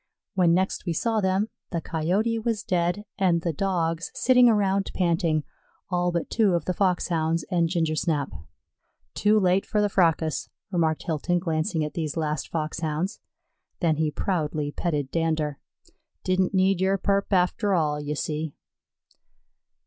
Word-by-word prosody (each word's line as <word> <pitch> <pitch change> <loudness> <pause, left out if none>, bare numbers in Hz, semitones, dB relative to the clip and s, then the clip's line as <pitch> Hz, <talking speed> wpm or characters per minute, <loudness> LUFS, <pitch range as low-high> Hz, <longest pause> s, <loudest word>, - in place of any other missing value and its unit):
When 175 -3 +4
next 190 +1 -1
we 170 - +1
saw 225 +5 0
them 190 +3 +1 0.2
the 170 - -2
Coyote 185 +9 0
was 225 -2 -2
dead, 180 +3 0
and 175 -3 +3
the 170 - -1
Dogs 165 -1 -1
sitting 250 -1 +5
around 200 -3 +2
panting, 165 -3 +1 0.5
all 175 0 +1
but 170 -1 -2
two 210 -6 +2
of 170 - -1
the 185 - 0
Foxhounds 170 -4 0
and 170 -2 +2
Gingersnap. 160 -3 0 0.8
"Too 210 +1 +3
late 185 0 +3
for 210 - -1
the 205 0 +2
fracas," 165 -4 +1 0.2
remarked 160 -4 +1
Hilton, 170 +2 0
glancing 160 -1 -1
at 150 - -6
these 155 -2 -3
last 155 -1 -1
Foxhounds. 160 +4 -2 0.6
Then 165 -5 +2
he 155 -1 +1
proudly 150 -3 -2
petted 145 -5 -2
Dander. 155 -3 -1 0.6
"Didn't 185 +1 +1
need 190 0 +3
yer 190 +1 +2
purp 200 +1 0
after 190 +2 +2
all, 150 -3 0
ye 145 +1 -3
see." 155 0 -3
175 Hz, 145 wpm, -25 LUFS, 160-190 Hz, 0.8 s, sitting